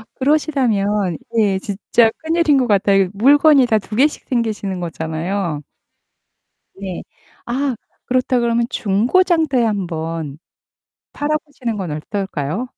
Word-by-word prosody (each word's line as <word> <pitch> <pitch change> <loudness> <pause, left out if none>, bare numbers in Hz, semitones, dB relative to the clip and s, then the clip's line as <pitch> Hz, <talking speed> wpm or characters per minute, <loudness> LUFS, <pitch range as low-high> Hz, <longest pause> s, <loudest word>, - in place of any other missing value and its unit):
그러시다면 225 - +1 0.2
예 200 -4 +2
진짜 210 +4 +1
큰일인 320 -3 +2
것 255 - +1
같아요. 195 -2 +3
물건이 280 +5 +5
다 220 - +3
2 210 +1 -8
개씩 290 +6 +1
생기시는 215 -6 -2
거잖아요. 165 0 -3 1.1
네. 190 -2 -6 0.4
아 265 +2 -1 0.3
그렇다 255 0 +1
그러면 235 0 +1
중고 225 - +2
장터에 315 -9 +2
한번 165 -7 -3 0.7
팔아보시는 290 -6 -3
건 185 -5 -4
어떨까요? 185 - -3
215 Hz, 255 characters per minute, -19 LUFS, 190-265 Hz, 1.1 s, 물건이